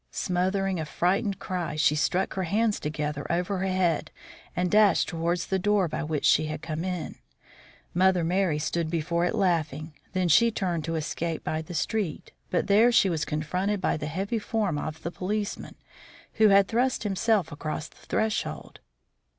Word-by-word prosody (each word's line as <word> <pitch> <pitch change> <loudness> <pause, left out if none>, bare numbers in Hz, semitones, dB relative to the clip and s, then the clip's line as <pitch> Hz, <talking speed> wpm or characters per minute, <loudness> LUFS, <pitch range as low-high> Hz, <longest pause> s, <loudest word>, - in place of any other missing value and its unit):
Smothering 190 +1 -1
a 160 - -2
frightened 190 +6 0
cry, 175 -5 -3
she 155 -1 +3
struck 180 +5 0
her 190 - -2
hands 215 +4 +1
together 150 0 -3
over 180 +3 -1
her 190 - -1
head 185 -4 +1 0.5
and 180 0 0
dashed 210 -4 +5
towards 170 +1 -1
the 190 - -1
door 205 -1 +2
by - - -3
which 150 -1 -2
she 155 - +4
had 155 0 -5
come 160 0 -3
in. 180 -3 -4 0.8
Mother 185 0 +3
Merry 175 -2 +1
stood 155 +2 -1
before 170 +1 0
it 180 - -1
laughing. 160 -6 0 0.2
Then 185 -1 +1
she 230 +9 +5
turned 180 -7 -2
to 165 - -2
escape 160 +1 -3
by 155 0 -2
the 165 +2 -8
street; 200 0 -2 0.2
but 180 - 0
there 220 +4 +5
she 195 -5 +4
was 160 -2 -1
confronted 180 +7 -1
by - - +1
the 150 -1 -4
heavy 195 +8 -2
form 205 -8 -1
of 155 +1 -6
the 170 - -3
policeman, 205 +3 -3 0.6
who 220 -1 +5
had 200 -1 +5
thrust 245 +1 0
himself 205 -3 +1
across 155 +1 -4
the - - -22
threshold. 220 0 -2
180 Hz, 175 wpm, -27 LUFS, 160-195 Hz, 0.8 s, dashed